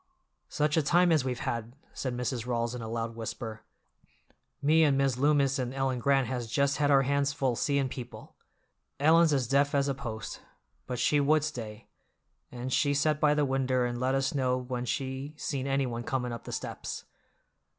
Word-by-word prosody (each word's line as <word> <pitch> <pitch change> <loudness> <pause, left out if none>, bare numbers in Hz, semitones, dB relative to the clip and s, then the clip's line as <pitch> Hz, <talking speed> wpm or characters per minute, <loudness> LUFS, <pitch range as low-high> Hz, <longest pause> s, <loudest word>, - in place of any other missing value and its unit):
"Such 150 +1 0
a - - +5
time 175 +4 +3
as 155 -5 +3
we've 125 -2 -3
had!" 115 +1 -3 0.2
said 125 -2 -3
Mrs. 125 -1 -3
Rawls 120 -1 -1
in 125 - -5
a 115 - -5
loud 115 0 -3
whisper. 110 -1 -6 1.0
"Me 155 +3 +4
and 140 -3 +3
Mis' 135 -2 +2
Loomis 140 0 +2
and 125 0 -3
Ellen 135 -2 0
Grant 135 +1 +3
has 120 -1 -3
just 140 +5 +1
had 145 -1 +2
our 135 -1 +5
hands 140 +1 +1
full 135 -4 0
seein' 140 +2 +1
people. 125 -1 -9 0.6
Ellen's 160 +2 +5
as 135 -4 +1
deaf 140 +2 +2
as 140 0 +2
a 140 - +1
post, 120 -5 -6 0.5
but 125 - -3
she 145 +4 +3
would 150 +1 +3
stay, 115 -7 -6 0.7
and 125 +1 -4
she 145 -1 +2
set 150 +1 +2
by 150 -1 +4
the 150 -1 +2
winder 130 -2 +1
and 120 0 -3
let 130 +1 +1
us 135 0 0
know 130 -3 +1
when 125 -1 -4
she 135 +4 -3
seen 140 -3 -3
anyone 135 -4 -1
comin' 125 0 -2
up 115 - -8
the - - -6
steps. - - -5
135 Hz, 190 wpm, -29 LUFS, 125-140 Hz, 1.0 s, a